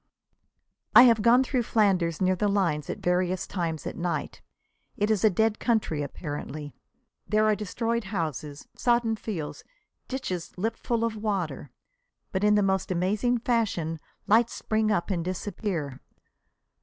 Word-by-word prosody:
I 245 - +11
have 230 -4 +5
gone 240 +4 +5
through 255 -1 0
Flanders 190 -7 +1
near 185 0 +3
the 205 +3 0
lines 175 -8 0
at - - -3
various 180 0 0
times 165 -5 -3
at - - -4
night. 170 -4 -3 0.6
It 210 +1 +1
is 210 -4 +1
a 220 - +7
dead 220 +3 +1
country 215 -10 0
apparently. 145 0 -6 0.5
There 215 0 +3
are 215 - +4
destroyed 230 +2 -2
houses, 155 - -4
sodden 235 -2 +2
fields, 190 -8 -5 0.4
ditches 185 -12 -4
lipful 225 +3 -1
of 230 -1 -1
water. 205 -6 -3 0.6
But 190 +1 -1
in 210 0 +5
the 205 - +3
most 190 -1 0
amazing 205 +7 +1
fashion 200 -10 0 0.3
lights 225 +3 +4
spring 220 0 0
up 205 -2 0
and 170 -3 0
disappear. 180 - -4
200 Hz, 145 wpm, -27 LUFS, 170-220 Hz, 0.6 s, I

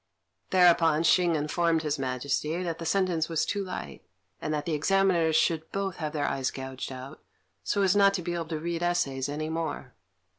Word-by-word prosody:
Thereupon 170 -3 +4
Hsing 170 0 +4
informed 165 +2 +1
His 150 -2 -1
Majesty 140 +6 -2
that 165 -2 -3
the 165 - -4
sentence 180 -5 +1
was 165 -1 0
too 200 -1 -2
light, 70 - -7 0.4
and - - -3
that 150 -1 -2
the 165 - -1
Examiners 170 0 +2
should 160 0 +1
both 195 -2 -3
have 155 -2 -3
their 145 -2 -1
eyes 135 -2 -1
gouged 130 0 -6
out, 130 +3 -9 0.4
so 200 - 0
as 190 -1 +3
not 200 -1 +5
to 180 - -3
be 175 - -3
able 170 -1 -3
to 160 -1 -3
read 170 +1 -3
essays 140 -7 0
any 155 +2 -3
more. 160 -5 -4
160 Hz, 190 wpm, -28 LUFS, 145-175 Hz, 0.4 s, not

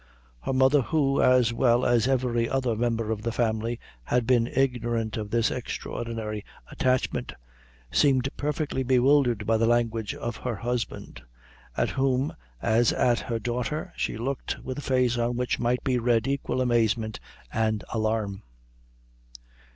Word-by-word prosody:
Her 65 - -3
mother, 130 +2 +4
who, 135 +2 +1
as 125 -2 +4
well 120 0 +3
as 120 -1 +3
every 125 -3 +1
other 130 -4 0
member 115 -1 -1
of 110 -2 -2
the 115 +1 -2
family, 115 0 -1 0.3
had 125 -1 +1
been 120 -1 +3
ignorant 120 -4 0
of 105 -2 -4
this 115 0 +1
extraordinary 115 -3 -4 0.3
attachment, 130 0 0 0.6
seemed 135 -3 +3
perfectly 150 -2 -2
bewildered 125 -3 +3
by 115 +1 +3
the 115 +1 +2
language 115 -3 0
of 120 -1 -4
her 125 -3 -3
husband, 115 - -4 0.6
at - - +1
whom, 135 +1 +1 0.3
as 115 +1 +3
at 120 -2 +2
her 115 - -3
daughter, 125 +6 -3
she - - -2
looked 130 +4 -3
with 130 +1 -5
a - - -5
face 125 -3 +1
on 120 +1 0
which 125 0 -1
might 120 +1 0
be 130 -2 +1
read 120 0 +2
equal 135 -1 -1
amazement 115 -3 +1 0.3
and 110 -1 0
alarm. 110 -3 -1
120 Hz, 145 wpm, -26 LUFS, 115-130 Hz, 0.6 s, mother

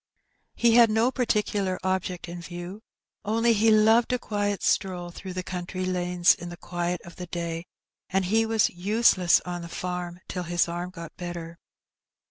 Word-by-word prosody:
He 235 -1 +4
had 235 -1 +7
no 225 +4 +2
particular 210 -6 0
object 185 -1 -2
in 175 0 -7
view, 175 +4 -8 0.4
only 230 +2 +2
he 225 +1 +3
loved 220 +2 +5
a 250 - +2
quiet 205 -3 -2
stroll 180 -3 0
through 185 +1 -8
the 185 0 -3
country 185 +1 -4
lanes 180 -1 +3
in 175 0 -8
the 175 - -8
quiet 175 0 -3
of 175 - -13
the 180 - -6
day, 170 0 -4 0.4
and 190 0 +1
he 220 +5 +3
was 225 -1 +2
useless 185 -1 +3
on 175 -1 -5
the 170 - -8
farm 180 0 -4
till 180 - -4
his 175 0 +1
arm 175 +1 -4
got 170 -3 -10
better. 170 -1 -6
180 Hz, 170 wpm, -26 LUFS, 175-215 Hz, 0.4 s, had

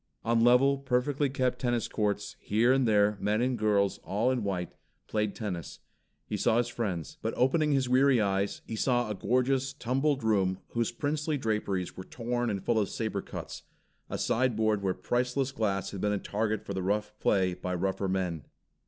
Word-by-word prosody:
On 115 0 +3
level, 135 +3 +5
perfectly 135 +2 0
kept 130 -1 0
tennis 120 -2 0
courts, 105 -1 -2
here 115 +5 +3
and 135 -2 +2
there, 105 -1 +3
men 105 +1 +1
and 125 +1 +1
girls 105 -3 +1
all 110 +6 0
in 125 -4 -1
white 90 -4 -3 0.3
played 105 -2 -1
tennis. 90 - -5 0.5
He - - -3
saw 110 - +2
his 120 0 +1
friends 95 - -3
But - - -2
opening 150 +4 +3
his 135 -2 +2
weary 130 0 +4
eyes, 100 -1 0
he 115 - -5
saw 120 -1 +1
a - - 0
gorgeous, 130 +5 +1
tumbled 135 +1 0
room 95 -4 +2
whose 115 -1 -1
princely 150 +4 -1
draperies 105 -6 -2
were 95 - -7
torn 120 +3 -2
and 100 -3 -3
full 115 -2 +2
of 100 - 0
saber 110 -3 -2
cuts, - - -7 0.5
a - - -3
sideboard 110 -4 +1
where 95 -2 0
priceless 125 +2 -1
glass 100 -5 -1
had 100 - -6
been 105 0 +1
a - - +1
target 110 +1 -2
for 100 - -4
the 95 - -2
rough 105 +3 -1
play 95 -3 +2
by 90 0 -4
rougher 95 +2 -1
men. 90 -5 -2
110 Hz, 185 wpm, -29 LUFS, 100-125 Hz, 0.5 s, level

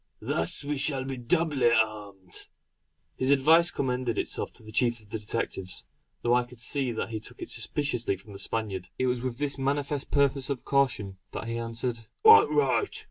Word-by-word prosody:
Thus 80 - -1
we 145 0 -2
shall 135 -2 +1
be 135 0 -4
doubly 135 -1 +2
armed." 105 -5 -2 0.7
His 130 - 0
advice 160 +5 +5
commended 125 -5 -2
itself - - -2
to - - -12
the 110 - -9
chief 120 +1 +2
of 105 -2 -20
the 110 - -3
detectives; 105 -3 -3 0.4
though 120 - +3
I 125 0 +4
could 120 -1 -14
see 130 +1 +1
that 110 - -3
he 110 -1 -4
took 120 +3 -10
it - - -6
suspiciously 120 -3 -1
from 100 +2 -14
the 100 - -9
Spaniard. 100 -3 -3
It 130 - 0
was 125 -1 0
with 135 +3 -2
manifest 140 +1 -1
purpose 140 -1 +2
of 140 -3 -3
caution 115 -9 0
that - - -5
he 115 0 -3
answered: 115 0 -3 0.2
"Quite 445 0 +9
right! 430 -2 +1
125 Hz, 185 wpm, -28 LUFS, 110-140 Hz, 0.7 s, Quite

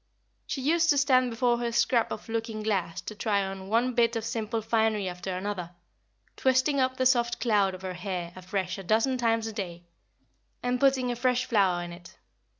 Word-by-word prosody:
She 270 - -3
used 330 +3 +3
to 290 - +5
stand 255 -3 +4
before 240 0 +1
her 240 -1 -1
scrap 235 0 +2
of 210 - -6
looking 225 -1 -3
glass 185 -5 -1
to 200 - -7
try 205 -1 0
on 190 0 -6
one 240 +3 +2
bit 235 -1 +2
of 225 -1 -2
simple 225 0 -2
finery 220 -2 +1
after 180 +1 -4
another, 185 -3 -4 0.6
twisting 260 +2 +2
up 260 0 +1
the 260 - +1
soft 240 -2 +2
cloud 205 -5 +2
of 185 - -12
her 185 -1 -4
hair 180 -1 -4
afresh 185 +1 -3
a - - -7
dozen 225 +7 +1
times 225 -1 +1
a 225 - -4
day, 175 -5 -5 0.8
and 245 0 0
putting 265 -2 +3
a - - -2
fresh 250 +1 +1
flower 195 -7 +2
in 175 0 -7
it. 175 0 -14
225 Hz, 195 wpm, -28 LUFS, 190-250 Hz, 0.8 s, to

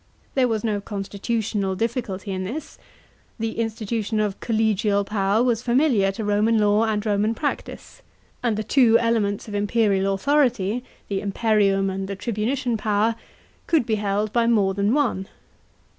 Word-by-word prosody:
There 260 -2 +3
was 225 -2 -1
no 210 -3 -1
con 200 -1 -5
stitutional 200 -2 -2
difficulty 220 -3 -3
in 185 0 -3
this. 275 +11 -6 0.6
The 225 0 -3
institution 220 -1 -2
of 210 -2 -1
collegia! 215 -2 +1
power 205 +2 +1
was 235 -3 +1
familiar 245 -5 +2
to 215 +2 -4
Roman 210 +2 +2
law 210 +1 +3
and 215 -1 -1
Roman 210 +1 +1
practice; 290 +5 -5 0.4
and 230 -4 0
the 215 - -2
two 230 -1 +5
elements 225 -4 0
of - - -8
the 205 - -1
imperial 205 -2 +1
authority 245 -3 +1
— - - -33
the 195 -1 -2
imperium 200 -2 +1
and 190 0 -4
the 200 - -4
tribu 215 +1 -3
nician 250 -4 -1
power— 215 +2 +1 0.5
could 320 -8 +2
be 225 - -1
held 205 +1 -1
by 235 -1 +2
more 205 -5 +3
than 200 +5 +1
one. 235 -10 0
215 Hz, 165 wpm, -23 LUFS, 200-230 Hz, 0.6 s, two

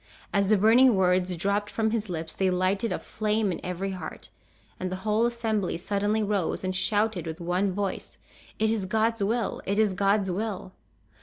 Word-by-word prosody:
As 200 -1 +2
the 215 - +5
burning 230 +4 +6
words 180 -1 +2
dropped 200 +4 0
from 220 -1 0
his 220 -3 -2
lips 160 -2 -5
they 190 -1 +1
lighted 185 +4 0
a - - 0
flame 215 -1 -1
in 170 - -5
every 180 +2 -3
heart, 180 -4 -7 0.5
and 185 0 -3
the - - -2
whole 215 +2 +3
assembly 220 -6 -1
suddenly 205 +4 0
rose, 200 -4 -1
and 185 0 -2
shouted 205 -1 0
with 160 0 -5
one 180 +3 0
voice, 195 +1 -4 0.4
"It 220 0 +2
is 210 -4 -1
God's 225 +2 +1
will! 225 +2 -1
It 200 +1 -1
is 215 -3 +3
God's 195 0 +2
will!" 195 -1 -4
200 Hz, 180 wpm, -27 LUFS, 185-220 Hz, 0.5 s, burning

